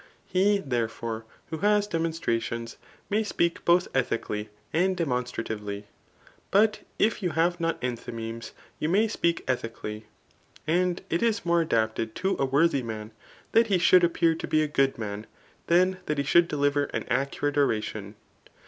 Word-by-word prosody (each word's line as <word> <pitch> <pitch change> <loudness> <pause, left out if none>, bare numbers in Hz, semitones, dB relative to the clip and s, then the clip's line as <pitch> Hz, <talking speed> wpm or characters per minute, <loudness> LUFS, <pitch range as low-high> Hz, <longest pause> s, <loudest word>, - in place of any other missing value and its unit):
He, 200 +2 +3
therefore, 115 - -3 0.3
who 160 - -3
has 205 +1 +3
demoa* 165 -4 0
^tcations, 115 -2 -2 0.3
may 210 +2 +1
speak 170 -5 0
)x)th 175 +1 +4
ethically 110 -4 -1 0.2
and 185 +3 +2
demionstrativelf. 115 -8 -3 0.7
But 215 +2 +3 0.2
if 220 0 +2
you 175 -4 -1
hive 175 +2 +1
not 165 0 -1
enthymemes, 115 -2 -5 0.3
you 150 - 0
may 205 +6 +3
speak 170 -6 0
«dii 130 -1 +1 0.2
cally. 105 +1 -6 0.6
A^d 180 +2 +1
it 170 - +1
is 225 -4 +1
more 170 0 +3
adapted 110 -6 0
to 190 +1 0
a 135 - +3
worthy 140 +1 +3
man 110 -2 -6 0.4
that 230 0 +5
he 195 -3 +3
should 180 +1 +6
appear 165 -1 +3
to 160 - -5
be 155 0 +3
a - - 0
good 135 -2 +1
man, 105 -1 -5 0.4
than 185 +2 +3
that 150 - 0
he 140 - +1
should 170 +5 +4
ddiver 145 -1 +1
an - - -1
accurate 140 +3 0
oradon. 110 -7 -1
150 Hz, 155 wpm, -27 LUFS, 115-180 Hz, 0.7 s, should